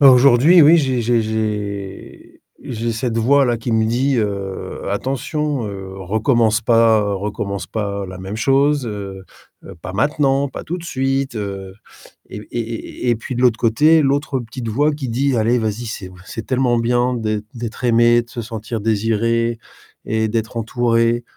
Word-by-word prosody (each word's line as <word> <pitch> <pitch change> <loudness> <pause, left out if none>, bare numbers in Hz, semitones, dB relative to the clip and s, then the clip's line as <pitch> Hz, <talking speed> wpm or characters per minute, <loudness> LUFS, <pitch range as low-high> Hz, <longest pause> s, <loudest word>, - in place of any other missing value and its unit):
Bah, 140 -2 +9
aujourd'hui, 130 +7 +6
oui, 155 +3 +7
j'ai 130 -6 +1
j'ai 115 0 +2
j'ai 105 -3 -5 0.2
j'ai 115 -1 -3
cette 115 0 -2
voix-là 125 +1 +3
qui 115 +2 -5
me 110 -1 +2
dit, 130 +4 +1
heu: 100 -4 -3
«Attention, 135 +4 -2
heu, 95 -1 -7
recommence 110 +3 +1
pas 110 -2 +3
recommence 100 -2 -4
pas 100 -1 -3
la 95 0 -9
même 95 +2 -6
chose, 135 +4 +2
heu, 100 -3 -6 0.6
pas 95 - -6
maintenant, 140 +5 +1
pas - - -8
tout 175 +3 -4
de - - -10
suite», 135 -3 -1
heu, 100 -2 -5 0.5
et - - -7
et - - -4
et 115 -1 -6
et - - +4
et - - +4
puis 120 +3 -6
de 125 - -1
l'autre 120 -3 +4
côté, 150 +8 +4
l'autre 140 -1 0
petite 115 +1 -7
voix 145 +8 +2
qui 145 -3 -5
dit: 130 +3 0
«Allez 115 +2 +2
vas-y, 110 +1 -3
c'est 95 -4 -6 0.2
c'est 115 - -6
tellement 125 -2 +1
bien 120 +2 +1
d'êt 110 -3 -2
d'être 120 0 -6
aimé, 120 0 +4
de 120 - -19
se 120 +1 -5
sentir 115 0 -5
désiré 115 +2 0 0.5
et 110 0 0
d'être 110 +1 -3
entouré, 115 +1 +1
115 Hz, 170 wpm, -19 LUFS, 110-130 Hz, 0.6 s, Bah